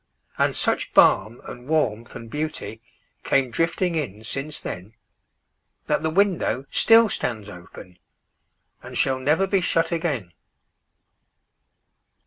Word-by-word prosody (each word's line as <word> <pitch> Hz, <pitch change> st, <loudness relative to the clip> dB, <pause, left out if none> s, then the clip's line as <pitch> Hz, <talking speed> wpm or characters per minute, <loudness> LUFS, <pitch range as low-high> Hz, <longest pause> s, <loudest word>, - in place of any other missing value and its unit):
And -, -, +2 dB
such -, -, -1 dB
balm 110 Hz, +4 st, +4 dB
and 125 Hz, +1 st, -10 dB
warmth 120 Hz, -8 st, -1 dB
and 115 Hz, -1 st, -8 dB
beautyCame 135 Hz, -2 st, -4 dB
drifting 170 Hz, +5 st, 0 dB
in 115 Hz, -10 st, -4 dB
since 135 Hz, +6 st, -4 dB
then, 95 Hz, +6 st, -8 dB, 0.9 s
That -, -, 0 dB
the 160 Hz, -, 0 dB
window 180 Hz, -7 st, +1 dB
still 230 Hz, 0 st, +6 dB
stands 110 Hz, -, -3 dB
openAnd 90 Hz, -1 st, -13 dB, 1.0 s
shall 130 Hz, -1 st, +1 dB
never 150 Hz, +8 st, +2 dB
be 195 Hz, -1 st, +1 dB
shut 165 Hz, -1 st, +1 dB
again. 145 Hz, -, -2 dB
135 Hz, 110 wpm, -23 LUFS, 110-165 Hz, 1.0 s, still